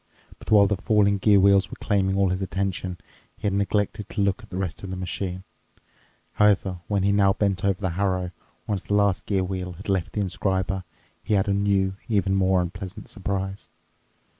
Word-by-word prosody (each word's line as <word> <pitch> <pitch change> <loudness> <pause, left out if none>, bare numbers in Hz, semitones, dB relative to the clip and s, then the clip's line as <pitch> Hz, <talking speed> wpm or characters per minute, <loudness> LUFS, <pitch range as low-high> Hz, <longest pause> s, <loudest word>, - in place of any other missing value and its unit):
But - - -11
while 105 -2 +7
the 100 0 0
falling 100 0 +2
gear 100 0 +5
wheels 100 0 +4
were - - -8
claiming 95 -2 +1
all 100 -1 +3
his 95 +1 -2
attention, 95 -1 -2 0.4
he - - -8
had 100 - +1
neglected 100 +1 -1
to 105 - -2
look 100 -1 +1
at - - -15
the 90 - -5
rest 95 -4 -3
of 95 - -7
the 95 - -4
machine. 90 0 -4 0.9
However, 100 -3 +2
when 100 -2 0
he 100 - +3
now 100 -1 +4
bent 100 -3 0
over 100 -1 +1
the 95 -3 -1
harrow, 90 0 -1 0.3
once 100 -3 -2
the 105 - -1
last 100 -2 +2
gear 95 -2 +1
wheel 90 -1 -4
had 100 +5 -9
left 95 -4 0
the 105 - -1
inscriber, 95 0 -1 0.4
he 105 - 0
had 95 0 +2
a 100 - +2
new, 100 -1 +1
even 100 -3 +2
more 95 -1 +3
unpleasant 90 +2 -7
surprise. 95 -1 -4
95 Hz, 195 wpm, -25 LUFS, 95-100 Hz, 0.9 s, while